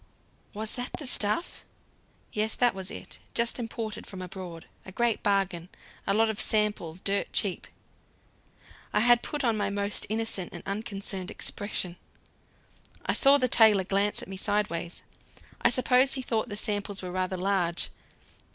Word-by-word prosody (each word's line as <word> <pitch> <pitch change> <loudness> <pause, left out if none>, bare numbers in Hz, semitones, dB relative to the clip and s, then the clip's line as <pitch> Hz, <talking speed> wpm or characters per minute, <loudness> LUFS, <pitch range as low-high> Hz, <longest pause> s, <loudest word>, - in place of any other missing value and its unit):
"Was 215 +1 -4
that 245 +1 -4
the 300 - -7
stuff?" 230 - 0 0.7
"Yes, 215 +1 0
that 245 -1 +3
was 190 0 -5
it. - - -6 0.2
Just 235 +2 +2
imported 225 -2 -5
from 190 - -8
abroad. 180 -2 -7 0.2
A 190 - -10
great 235 +2 +1
bargain. 190 -4 0 0.4
A 195 - +3
lot 225 +1 +4
of 220 -1 -2
samples 210 -6 0
dirt 200 +1 -1
cheap." 195 -3 0 1.3
I - - +4
had 240 +1 +7
put 295 -1 -3
on 230 -3 +2
my 205 -1 0
most 200 0 -1
innocent 220 -4 -1
and 175 - -8
unconcerned 195 -2 -3
expression. 185 -4 -3 1.1
I - - +2
saw 280 0 +7
the 255 -2 +2
tailor 220 -5 +6
glance 200 +2 +1
at - - -9
me 190 0 -7
sideways; 185 -5 -2 0.6
I - - +5
suppose 255 +1 +4
he 260 - -3
thought 230 0 -1
the 205 - -4
samples 205 -2 -2
were 180 - -4
rather 185 0 -1
large. 180 -2 0
205 Hz, 155 wpm, -28 LUFS, 190-225 Hz, 1.3 s, had